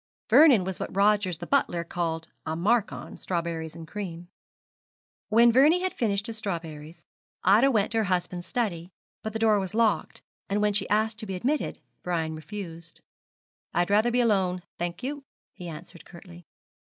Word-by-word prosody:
Vernon 275 Hz, -, +7 dB
was 190 Hz, 0 st, -4 dB
what -, -, -5 dB
Rogers 200 Hz, -3 st, +3 dB
the -, -, -7 dB
butler 175 Hz, -11 st, +1 dB
called 165 Hz, -1 st, -3 dB, 0.2 s
'a 160 Hz, -, -3 dB
mark 210 Hz, +6 st, +2 dB
on' -, -, -8 dB
strawberries 165 Hz, -3 st, -3 dB
and 165 Hz, -1 st, -9 dB
cream. 175 Hz, -3 st, -6 dB, 1.0 s
When 235 Hz, +2 st, +6 dB
Vernie 300 Hz, +9 st, +5 dB
had 370 Hz, -, -1 dB
finished 205 Hz, -3 st, 0 dB
his 225 Hz, -2 st, -3 dB
strawberries, 165 Hz, -4 st, -6 dB, 0.4 s
Ida 215 Hz, +8 st, +5 dB
went 215 Hz, -5 st, +1 dB
to 225 Hz, -, +1 dB
her -, -, +2 dB
husband's 180 Hz, -1 st, -2 dB
study; 185 Hz, -8 st, -2 dB, 0.3 s
but 220 Hz, -, -4 dB
the 225 Hz, -, -3 dB
door 220 Hz, -2 st, +3 dB
was 190 Hz, +1 st, -4 dB
locked, 220 Hz, -8 st, +1 dB, 0.3 s
and 200 Hz, +1 st, +1 dB
when 210 Hz, 0 st, +2 dB
she 205 Hz, -, 0 dB
asked 215 Hz, +1 st, +1 dB
to 220 Hz, -, -4 dB
be 190 Hz, -, -3 dB
admitted 275 Hz, +11 st, -1 dB, 0.2 s
Brian 165 Hz, -3 st, -2 dB
refused. 165 Hz, 0 st, -8 dB, 0.7 s
'I'd 175 Hz, +3 st, +1 dB
rather 215 Hz, +3 st, +4 dB
be 245 Hz, +1 st, +2 dB
alone, 190 Hz, -6 st, +1 dB, 0.2 s
thank 175 Hz, +3 st, -4 dB
you,' 285 Hz, +2 st, -4 dB, 0.3 s
he 180 Hz, -, -9 dB
answered, 170 Hz, +1 st, -9 dB
curtly. 175 Hz, -1 st, -14 dB
195 Hz, 170 wpm, -27 LUFS, 170-220 Hz, 1.0 s, Vernon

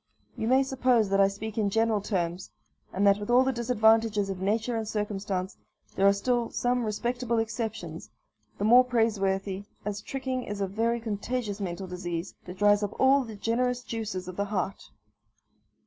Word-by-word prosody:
You 220 Hz, -, -3 dB
may 260 Hz, +2 st, +4 dB
suppose 255 Hz, -5 st, +2 dB
that 195 Hz, 0 st, +2 dB
I 195 Hz, -, +6 dB
speak 210 Hz, +2 st, -5 dB
in 205 Hz, -2 st, +2 dB
general 225 Hz, 0 st, +1 dB
terms; 180 Hz, -2 st, -2 dB, 0.4 s
and 195 Hz, +2 st, 0 dB
that, 200 Hz, 0 st, +5 dB
with 205 Hz, -, -6 dB
all 245 Hz, +2 st, +6 dB
the 265 Hz, -, +1 dB
disadvantages 225 Hz, -3 st, +2 dB
of 185 Hz, -1 st, -6 dB
nature 220 Hz, +4 st, 0 dB
and 220 Hz, -1 st, -2 dB
circumstances, 200 Hz, -3 st, -3 dB, 0.4 s
there 195 Hz, -, +3 dB
are -, -, +7 dB
still 240 Hz, +3 st, 0 dB
some 245 Hz, 0 st, 0 dB
respectable 235 Hz, +2 st, -1 dB
exceptions, 220 Hz, -, -4 dB, 0.5 s
the -, -, -3 dB
more 240 Hz, +4 st, +7 dB
praiseworthy, 200 Hz, -5 st, 0 dB, 0.2 s
as 205 Hz, -1 st, -3 dB
tricking 260 Hz, +1 st, -3 dB
is 205 Hz, -2 st, -5 dB
a 200 Hz, -, +1 dB
very 225 Hz, +5 st, 0 dB
contagious 220 Hz, 0 st, -3 dB
mental 190 Hz, 0 st, -4 dB
disease, 180 Hz, -1 st, -5 dB
that 180 Hz, +1 st, -9 dB
dries 205 Hz, +1 st, +4 dB
up 205 Hz, 0 st, -4 dB
all 270 Hz, +1 st, +5 dB
the 225 Hz, -3 st, -8 dB
generous 245 Hz, +4 st, 0 dB
juices 215 Hz, -6 st, -4 dB
of 185 Hz, -, -7 dB
the 200 Hz, -, 0 dB
heart. 195 Hz, -1 st, -3 dB
215 Hz, 175 wpm, -28 LUFS, 195-235 Hz, 0.5 s, are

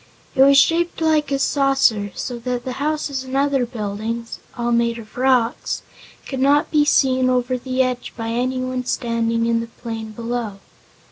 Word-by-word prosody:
It 265 Hz, -, +2 dB
was 275 Hz, +1 st, +7 dB
shaped 335 Hz, +4 st, +3 dB
like 310 Hz, -3 st, +2 dB
a 275 Hz, -, +2 dB
saucer, 270 Hz, -8 st, +2 dB
so 245 Hz, -2 st, -4 dB
that 245 Hz, 0 st, -3 dB
the 260 Hz, -, -3 dB
houses 295 Hz, -3 st, -1 dB
and 260 Hz, +1 st, -3 dB
other 275 Hz, -3 st, +1 dB
buildings 225 Hz, 0 st, -4 dB, 0.2 s
all 240 Hz, 0 st, -1 dB
made 235 Hz, 0 st, +1 dB
of 215 Hz, -2 st, -12 dB
rocks 250 Hz, -2 st, +1 dB, 0.4 s
could 265 Hz, -, -5 dB
not 285 Hz, +2 st, +3 dB
be 300 Hz, -1 st, +4 dB
seen 260 Hz, -3 st, +3 dB
over 255 Hz, 0 st, +1 dB
the 255 Hz, +1 st, 0 dB
edge 250 Hz, -1 st, -3 dB
by 225 Hz, -1 st, -3 dB
anyone 255 Hz, +1 st, -1 dB
standing 230 Hz, -1 st, 0 dB
in 230 Hz, 0 st, +2 dB
the 230 Hz, -, -4 dB
plain 225 Hz, -1 st, -7 dB
below. 230 Hz, -2 st, -4 dB
250 Hz, 165 wpm, -21 LUFS, 230-270 Hz, 0.4 s, was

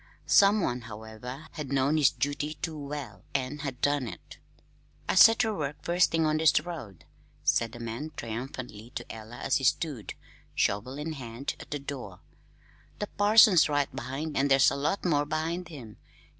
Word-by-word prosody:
Someone, 195 Hz, -, +4 dB
however, 110 Hz, +5 st, -9 dB
had 150 Hz, -4 st, -6 dB
known 140 Hz, +2 st, +2 dB
his 150 Hz, -3 st, +5 dB
duty 145 Hz, +4 st, -2 dB
too 165 Hz, -3 st, -5 dB
well 140 Hz, -9 st, -7 dB
and 135 Hz, +2 st, -2 dB
had 135 Hz, -3 st, -5 dB
done 145 Hz, -3 st, +1 dB
it. -, -, -10 dB, 0.7 s
"I -, -, +1 dB
set 225 Hz, +4 st, +8 dB
ter 220 Hz, -3 st, +1 dB
work 150 Hz, -4 st, -3 dB
first 175 Hz, +1 st, +3 dB
thing 165 Hz, -1 st, +1 dB
on 155 Hz, 0 st, +2 dB
this 160 Hz, 0 st, +4 dB
road," 120 Hz, -, -8 dB, 0.4 s
said 115 Hz, -1 st, +2 dB
the 120 Hz, -, -10 dB
man 115 Hz, +6 st, -5 dB
triumphantly 120 Hz, -1 st, -6 dB
to -, -, -4 dB
Ella 110 Hz, +1 st, -10 dB
as 135 Hz, -, +1 dB
he 135 Hz, -, -5 dB
stood, 135 Hz, -3 st, 0 dB, 0.4 s
shovel 115 Hz, +7 st, 0 dB
in 155 Hz, +2 st, -4 dB
hand, 125 Hz, -1 st, -5 dB
at -, -, -11 dB
the 145 Hz, -, -2 dB
door. 130 Hz, -10 st, -7 dB, 0.8 s
"The 210 Hz, -, -4 dB
parson's 205 Hz, -6 st, +6 dB
right 145 Hz, -3 st, 0 dB
behind, 135 Hz, +5 st, -4 dB
an' 140 Hz, -, +2 dB
there's 135 Hz, -1 st, +5 dB
a -, -, -2 dB
lot 150 Hz, +9 st, -1 dB
more 145 Hz, -4 st, +3 dB
behind 165 Hz, +3 st, -2 dB
him. 125 Hz, -, -10 dB
140 Hz, 170 wpm, -28 LUFS, 120-155 Hz, 0.8 s, set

